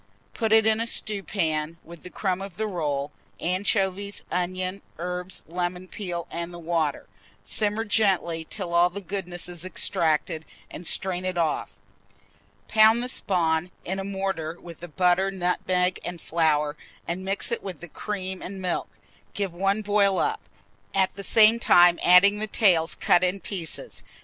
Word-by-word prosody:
Put 225 -2 -1
it 220 0 +6
in 220 0 +3
a 230 - -1
stewpan, 170 -8 -1
with 170 -1 -12
the 180 - -10
crumb 185 -1 -2
of 195 -3 -8
the 220 - -1
roll, 150 -7 -2 0.3
anchovies, 195 +2 0
onions, 185 +2 -2 0.2
herbs, 180 +2 -4
lemon 180 +2 -3
peel, 175 -4 -5
and 170 +1 -4
the 175 - -9
water; 165 -4 -1 0.4
simmer 215 +1 0
gently 190 -6 +2
till 185 -5 -4
all 175 +1 +5
the 190 +3 -6
goodness 180 -3 -4
is 175 -1 -7
extracted, 160 -3 0 0.3
and 175 - -6
strain 185 -1 0
it 185 -1 -2
off. 160 -3 -1 0.9
Pound 220 +2 +5
the 250 - -2
spawn 175 -7 0 0.2
in 190 +2 -2
a - - -3
mortar, 190 -4 -3
with 170 -2 -11
the 175 - -8
butter, 180 +3 +2
nutmeg, 180 0 0
and 175 -1 -5
flour, 150 -3 +1 0.3
and 175 +2 -3
mix 195 +5 -1
with 190 -2 -6
it - - -26
the 175 - -7
cream 190 +1 -5
and 195 +1 -6
milk. 180 -2 -2 0.5
Give 195 -4 -2
one 195 +4 0
boil 200 -2 +3
up, - - 0 0.5
at 190 -1 +2
the 200 - -6
same 220 +2 +5
time 175 -5 +6
adding 200 +3 +6
the 215 - -2
tails 180 -7 +3
cut 175 - +3
in 185 +2 +1
pieces. 175 -3 -5
180 Hz, 160 wpm, -25 LUFS, 170-200 Hz, 0.9 s, it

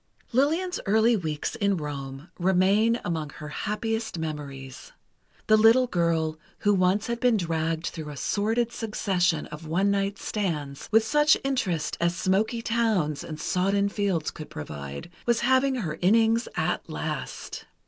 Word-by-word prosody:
Lillian's 320 +9 +1
early 220 +3 +4
weeks 155 -7 -3
in 200 -5 +1
Rome 140 0 -6
remain 195 +6 +3
among 160 -3 -2
her 150 - -8
happiest 220 +4 -3
memories. 140 -5 -6 0.5
The 215 - +5
little 225 +4 +6
girl 165 -6 0 0.2
who 205 - +3
once 190 +2 +2
had 235 0 -2
been 245 -3 +3
dragged 165 -2 -1
through 155 -2 -5
a 145 - -8
sordid 225 - 0
succession 185 -8 0
of 155 +1 -9
one 190 +5 +2
night 200 0 0
stands, 150 -9 -3
with 220 0 +5
such 295 +6 +4
interest 195 - -1
as 170 0 +2
smoky 210 +6 0
towns 220 -11 0
and 155 -1 -7
sodden 195 +4 +1
fields 195 -6 -1
could 155 - -9
provide, 70 - -7 0.2
was 235 -1 +2
having 260 +2 +3
her 160 -10 -3
innings 225 +4 +3
at - - -1
last. - - -5
195 Hz, 145 wpm, -26 LUFS, 160-225 Hz, 0.5 s, little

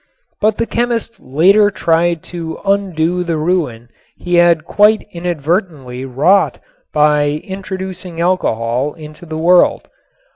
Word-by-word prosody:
But 215 0 +1
the 230 - 0
chemist 235 -1 -2
later 190 +10 +3
tried 170 -3 0
to 165 -2 -5
undo 180 -3 0
the 170 -2 -2
ruin 150 -9 -2 0.3
he 175 - -5
had 170 -2 +4
quite 210 +4 +3
inadvertently 165 - -3
wrought 150 +10 +2 0.3
by 150 0 +2
introducing 190 -2 -7
alcohol 135 -6 0
into 155 +1 -12
the 155 0 -5
world. 175 +2 +3
170 Hz, 115 wpm, -16 LUFS, 150-190 Hz, 0.3 s, had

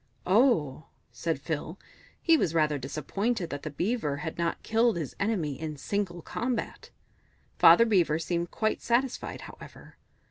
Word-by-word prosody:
"Oh," 180 - +2 0.2
said 165 -3 -2
Phil. 155 +4 -4 0.4
He 330 - +4
was 170 - 0
rather 155 -2 +2
disappointed 175 - -2
that 145 - -4
the 155 - -5
Beaver 155 - -1
had 160 - -4
not 170 -1 -1
killed 225 -2 +2
his 155 -5 -5
enemy 170 - -1
in 155 -2 -4
single 175 0 -3
combat; 240 0 -3 0.7
Father 230 - +8
Beaver 175 -8 +3
seemed 170 +1 -2
quite 215 -1 -1
satisfied, 245 +2 -1
however. - - -13
170 Hz, 140 wpm, -28 LUFS, 155-225 Hz, 0.7 s, Father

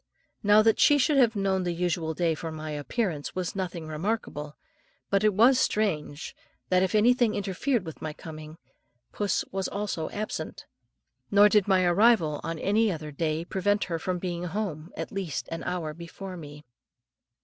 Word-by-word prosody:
Now 210 0 +6
that 225 0 +3
she 290 - +6
should 290 +1 +2
have 235 -4 +4
known 195 -1 +1
the 175 -1 -2
usual 170 -2 -1
day 170 -1 +1
for 160 +1 -5
my 155 0 -6
appearance 150 - -3
was 185 0 -3
nothing 175 -4 -4
remarkable, 155 -3 -3 0.6
but 200 +1 +3
it 215 - +5
was 240 +6 +5
strange 165 - -1 0.3
that, 185 0 +4
if 190 +2 +1
anything 240 +1 +4
interfered 200 +3 -1
with 160 - -9
my 155 - -3
coming, 155 0 -10 0.5
puss 205 -2 -1
was 190 0 -2
also 200 -6 -3
absent, 215 +1 -5 0.6
nor 205 +1 +6
did 210 -2 +3
my 190 -2 +4
arrival 175 -4 +3
on 165 +1 -3
any 210 +5 +2
other 155 -3 -5
day 155 +2 -2
prevent 205 +3 0
her 165 -2 -3
from 185 +2 -2
being 175 -1 -4
at - - -4
home 180 -6 -3
at - - -4
least 190 -8 -4
an 165 - -4
hour 170 -4 -3
before 175 +3 -8
me. 150 -3 -10
185 Hz, 170 wpm, -27 LUFS, 160-210 Hz, 0.6 s, Now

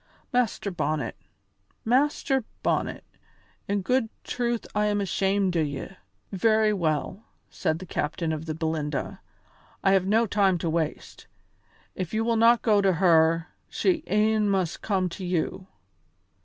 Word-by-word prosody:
Master 240 -4 0
Bonnet, 155 -3 -2 0.7
Master 265 +1 +2 0.2
Bonnet, - - -1 0.6
in 200 -1 -1
good 250 +2 +1
truth 240 -1 -2
I 210 0 +1
am 205 0 +1
ashamed 195 -1 0
o' - - +2
ye." 145 -1 -3 0.4
"Very 215 +2 +3
well," 170 +3 -2 0.3
said 155 - -1
the 185 - -9
captain 165 0 -2
of 155 0 -5
the 155 - -3
Belinda, 160 -2 -3 0.6
"I 195 - +4
have 190 -1 +3
no 225 +3 +3
time 195 -3 +2
to 165 -1 -2
waste; 160 -2 -3 0.7
if 185 +2 -4
you 220 - +1
will 230 0 +1
not 230 +1 +5
go 210 -3 +4
to 195 -1 +3
her, 165 -1 +3 0.2
she 345 -5 0
e'en 215 0 +2
must 190 -4 -1
come 190 -3 0
to 185 +3 -8
you. 180 +1 -2
195 Hz, 140 wpm, -26 LUFS, 165-220 Hz, 0.7 s, not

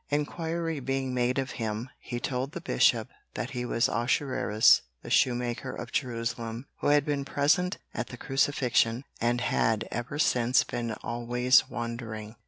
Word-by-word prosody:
Inquiry 160 +2 -2
being 135 0 -2
made 125 +1 +1
of 135 -1 -1
him, 110 +3 -3
he 120 - -5
told 130 +2 -2
the - - -4
Bishop 60 - +2 0.3
that - - -3
he 125 0 -3
was 115 -1 +2
Ahasuerus 120 -2 +3 0.2
the - - -8
shoe 125 - +4
maker 120 0 -3
of 120 - -7
Jerusalem, 115 -1 -3
who - - -1
had 145 -1 +4
been 145 -2 -1
present 165 +7 +1 0.2
at - - -3
the 120 - -9
Crucifixion 130 -3 +1 0.2
and 120 +1 +1
had 110 -3 +1
ever 120 +5 -4
since 125 -6 +3
been 115 -2 -3
always 120 +1 +2
wandering. 115 -2 -5
125 Hz, 155 wpm, -28 LUFS, 115-135 Hz, 0.3 s, shoe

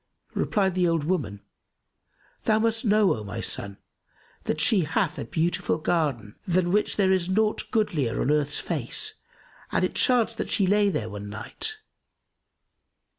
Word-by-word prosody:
Replied 195 -3 +1
the 180 -1 +2
old 165 -3 +1
woman, 110 - -2 1.0
"Thou 215 - +4
must 225 0 0
know 210 -2 +4
O 110 - -7
my 100 0 -6
son, 100 0 -2 0.7
that 155 - -1
she 170 +8 +4
hath 160 -2 0
a - - -4
beautiful 165 -1 0
garden, 145 -11 -1
than 175 0 +2
which 210 +2 +1
there 190 -2 +3
is 185 -2 +1
naught 215 +3 +1
goodlier 165 - 0
on 140 - +1
earth's 150 -1 +1
face - - -1 0.6
and - - +2
it - - -3
chanced 235 -3 +2
that - - -2
she 200 - +3
lay 205 +2 +3
there 110 - -2
one 105 -1 -7
night. 120 - -5
175 Hz, 155 wpm, -26 LUFS, 145-210 Hz, 1.0 s, Thou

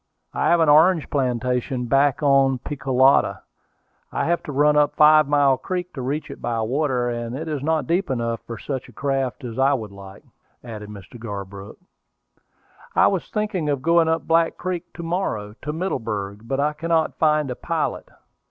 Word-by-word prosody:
I - - 0
have 170 - +4
an 160 - +3
orange 160 +3 +4
plantation 125 -1 -1
back 140 +3 +2
of 135 -2 +3
Picolata; 135 -2 +2 0.7
I - - -1
have 170 +1 +1
to - - -7
run 150 +2 +3
up 150 -1 +3
Five 155 -1 +6
Mile 140 -2 +3
Creek 180 +2 -4
to 135 - -6
reach 140 +5 -3
it - - -10
by 120 -1 -2
water; 125 +1 0
and 120 +1 -4
it 160 +3 -6
is 150 -3 -3
not 155 -1 0
deep 180 +7 0
enough 115 -3 -2
for 115 - -6
such 130 +3 -5
a - - -16
craft 135 -1 -2
as 120 0 -6
I 135 +1 +4
would 110 -5 -6
like," 100 0 -12 0.4
added 110 -3 -8
Mr. 105 +3 -11
Garbrook. 100 -2 -8 1.2
"I - - +5
was 190 -4 0
thinking 210 -7 -2
of 140 -2 -1
going 165 0 +4
up 160 -2 0
Black 165 0 +2
Creek 180 -1 -4
to 170 - -7
morrow, 165 - -2
to 150 - -3
Middleburg; 115 - -4
but 135 +3 -1
I 150 +1 +1
cannot 165 +1 -1
find 150 -3 +2
a - - -4
pilot. 165 +3 -3
140 Hz, 180 wpm, -22 LUFS, 120-160 Hz, 1.2 s, Five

